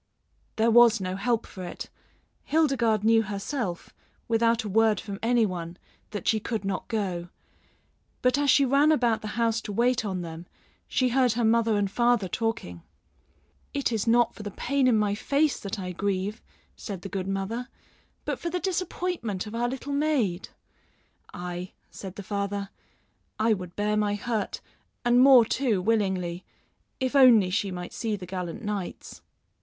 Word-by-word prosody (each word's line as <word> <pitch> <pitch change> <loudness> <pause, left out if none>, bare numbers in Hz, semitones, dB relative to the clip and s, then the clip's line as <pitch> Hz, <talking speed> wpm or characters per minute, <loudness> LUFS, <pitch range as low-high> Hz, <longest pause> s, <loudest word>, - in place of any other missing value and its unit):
There 225 +1 +3
was 235 -1 +6
no 185 -1 -3
help 230 +3 0
for 185 - -9
it. 175 - -7 0.5
Hildegarde 255 -9 +2
knew 225 0 +5
herself, 200 -1 -4 0.3
without 230 0 +2
a - - -5
word 220 +1 +3
from 200 -2 -7
any 235 0 +3
one, 175 -3 -5 0.3
that 210 -1 -6
she 220 - +3
could 215 -1 -4
not 195 -1 -3
go; 185 -6 -2 0.9
but 250 +1 +4
as 290 -1 +1
she 275 +1 +5
ran 280 +4 +4
about 240 -7 +2
the 215 - -6
house 230 -1 +1
to 210 - -6
wait 240 +3 +2
on 190 -4 -3
them, 165 +1 -8 0.4
she 255 -1 +1
heard 250 -1 +3
her 235 0 0
mother 225 -1 +3
and 200 -1 0
father 240 -2 +2
talking. 175 - -3 0.9
"It 280 -3 0
is 220 -1 -1
not 235 0 +4
for - - -10
the 210 - -5
pain 270 +6 0
in 235 -3 +4
my 210 -1 +1
face 280 +7 +1
that 200 +1 -5
I 185 -2 -4
grieve," 200 +3 -2 0.3
said 195 -5 -7
the - - -4
good 190 -1 -4
mother; 195 +6 -3 0.6
"but - - -2
for 340 - -3
the 360 +1 -2
disappointment 355 - -2
of 210 - -8
our 240 +1 0
little 265 +2 -5
maid." 280 - 0 0.8
"Aye," 180 +1 -6 0.2
said 190 -1 -8
the 200 - -7
father, 200 0 -3 0.7
"I 220 +1 +3
would 180 -3 -6
bear 210 +1 0
my 210 -1 +1
hurt, 215 0 -3 0.4
and 240 0 +5
more 260 -3 +8
too, 230 -4 0
willingly, 190 -4 0 0.6
if 260 +1 -1
only 235 -9 +7
she 200 +1 0
might 180 -1 -6
see 225 -3 -2
the 190 -3 -8
gallant 180 +3 -5
knights." 205 -4 -5
220 Hz, 170 wpm, -27 LUFS, 195-240 Hz, 0.9 s, more